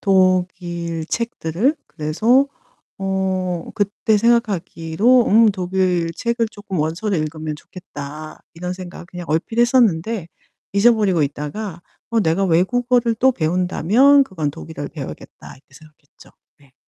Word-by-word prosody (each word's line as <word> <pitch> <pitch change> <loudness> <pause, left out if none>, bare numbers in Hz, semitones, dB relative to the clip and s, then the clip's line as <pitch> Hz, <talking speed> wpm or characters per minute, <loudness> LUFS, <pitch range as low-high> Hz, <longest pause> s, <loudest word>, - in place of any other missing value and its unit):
독일 180 -3 +1
책들을. 230 - -1
그래서 220 - +2 0.5
어 190 -2 -1
그때 205 +1 +1
생각하기로 220 0 +2
음 220 +1 +6
'독일 180 -3 0
책을 235 +3 -1
쪼끔 205 -4 -6
원서를 170 +6 -1
읽으면 155 0 -4
좋겠다.' 155 -3 -9
이런 180 +2 -4
생각 180 -1 -9
그냥 175 -1 -8
얼핏 165 +9 -1
했었는데 225 -6 +2 0.4
잊어 205 +5 +5
버리고 190 -7 +1
있다가 150 +6 -4 0.3
'어 230 -1 +2
내가 190 +1 +1
외국어를 235 +7 +2
또 260 +2 +4
배운다면 185 - +3
그건 160 - -3
독일어를 160 -1 -7
배워야겠다.' 135 - -9
이렇게 135 0 -23
생각했죠. 150 -1 -19 0.3
네. 140 -2 -24
185 Hz, 295 characters per minute, -20 LUFS, 160-220 Hz, 0.5 s, 음